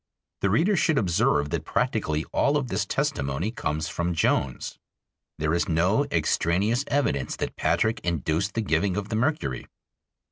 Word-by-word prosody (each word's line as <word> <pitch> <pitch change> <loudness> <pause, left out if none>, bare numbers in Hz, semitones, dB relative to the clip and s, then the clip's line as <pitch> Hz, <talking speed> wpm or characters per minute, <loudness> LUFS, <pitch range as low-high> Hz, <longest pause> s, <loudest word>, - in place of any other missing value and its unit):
The 100 - +1
reader 170 - +3
should 160 -4 +2
observe 80 - +2
that 85 -2 -1
practically 110 -8 0
all 145 +1 +3
of 135 -4 -2
this 100 0 -1
testimony 70 +9 -1
comes 80 -9 -2
from 85 0 -2
Jones. 70 -5 0 0.6
There 75 +1 0
is 85 - 0
no 90 - +2
extraneous 95 - +1
evidence 70 - 0
that - - -4
Patrick 110 0 +1
induced 85 +3 -1
the 115 - +1
giving 95 0 0
of 105 0 -3
the 110 - -2
mercury. 115 - -1
95 Hz, 150 wpm, -26 LUFS, 80-115 Hz, 0.6 s, reader